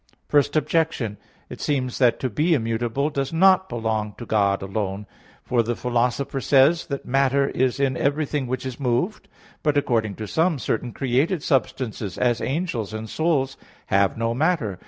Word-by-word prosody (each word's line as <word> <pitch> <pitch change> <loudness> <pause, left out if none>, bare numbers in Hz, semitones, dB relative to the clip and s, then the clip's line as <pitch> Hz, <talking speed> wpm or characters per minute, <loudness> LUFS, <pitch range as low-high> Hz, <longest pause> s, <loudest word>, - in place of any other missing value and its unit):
Objection 150 -3 +2
1: 105 - -14 0.3
It - - -8
seems 130 -4 -1
that 125 -3 +3
to 130 - 0
be 160 - +2
immutable 120 +4 -1
does 140 -2 -2
not 190 +2 +4
belong 110 -2 -2
to 120 - -7
God 100 -3 +1
alone. 100 0 -3 0.4
For 120 -2 +2
the 115 +1 -2
Philosopher 125 +3 -1
says 140 +6 +5
(Metaph. - - -4
ii) - - -13
that - - -22
"matter 135 +1 +2
is 130 +1 0
in 135 -2 +1
everything 145 -1 -1
which 130 +1 -3
is 130 0 -5
moved." 135 - -1 0.3
But, 150 -1 +1
according 115 -7 0
to 110 - -6
some, 160 - +1
certain 120 -1 -2
created 140 - 0
substances, 120 - -1
as 120 -2 +1
angels 130 - -2
and 110 0 -5
souls, 140 -2 0 0.3
have 100 0 +2
not 115 0 0
matter. 145 - 0
130 Hz, 170 wpm, -23 LUFS, 115-145 Hz, 0.4 s, says